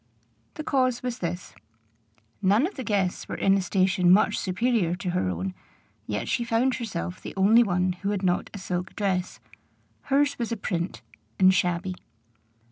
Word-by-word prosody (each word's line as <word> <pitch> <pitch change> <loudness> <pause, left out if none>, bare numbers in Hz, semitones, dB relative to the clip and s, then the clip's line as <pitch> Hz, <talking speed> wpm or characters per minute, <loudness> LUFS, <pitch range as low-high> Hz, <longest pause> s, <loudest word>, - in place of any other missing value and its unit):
The 310 - -5
cause 255 -4 +1
was 250 -1 -3
this: 175 +1 -4 0.9
none 205 +7 +4
of 380 - -4
the 260 - -6
guests 195 -5 -1
were - - -3
in 195 - +3
a 195 - +1
station 185 0 +2
much 195 - +5
superior 190 -2 0
to 180 -1 -3
her 175 - 0
own, 90 +1 -3 0.5
yet 105 0 -3
she 240 - 0
found 235 +3 +1
herself 90 - -5
the - - -8
only 210 +5 +6
one 185 -4 +1
who 200 - -1
had 200 -2 -2
not 180 -1 +1
a - - -8
silk 180 -1 -4
dress: 185 -3 -1 0.7
hers 280 0 +2
was 235 -1 -2
a 230 - -1
print, 175 -3 -3 0.3
and 190 0 +6
shabby. 180 +1 0
190 Hz, 170 wpm, -26 LUFS, 180-230 Hz, 0.9 s, only